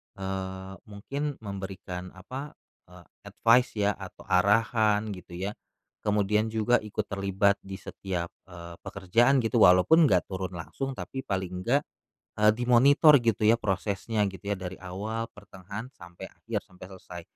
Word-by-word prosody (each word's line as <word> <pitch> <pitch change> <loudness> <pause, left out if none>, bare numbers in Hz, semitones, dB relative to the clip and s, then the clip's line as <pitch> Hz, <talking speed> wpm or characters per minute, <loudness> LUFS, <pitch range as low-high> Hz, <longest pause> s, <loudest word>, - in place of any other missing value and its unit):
eee, 95 0 -5
mungkin 140 +8 -4
memberikan 95 -2 -7
apa, 130 +10 -8 0.3
eee, 90 0 -15 0.2
advice 120 +2 +3
ya 105 -1 +2
atau - - -10
arahan 105 +2 +2
gitu 90 -2 -9
ya. 95 +3 -3 0.5
Kemudian 105 +1 +1
juga 110 +2 +2
ikut 105 0 -5
terlibat 100 +1 +1
di 95 0 -8
setiap, 90 -2 -5 0.2
eee, 85 -1 -10
pekerjaan 120 +8 +2
gitu 115 +1 +1
walaupun 105 - +6
gak 90 - +3
turun 95 -1 -4
langsung, 135 - -5
tapi 135 - -5
paling 95 -5 -3
enggak, 130 +8 +2 0.6
eee, 105 - +7
dimonitor 135 +5 +6
gitu 115 -3 +1
ya 115 +2 +6
prosesnya 105 +2 -1
gitu 95 -2 -11
ya 100 - -1
dari 95 0 -6
awal, 105 +5 -4
pertengahan, 100 +3 -9
sampai 85 -5 -12
akhir, - - -5
sampai 90 0 -13
selesai. 90 -2 -10
100 Hz, 140 wpm, -28 LUFS, 95-115 Hz, 0.6 s, eee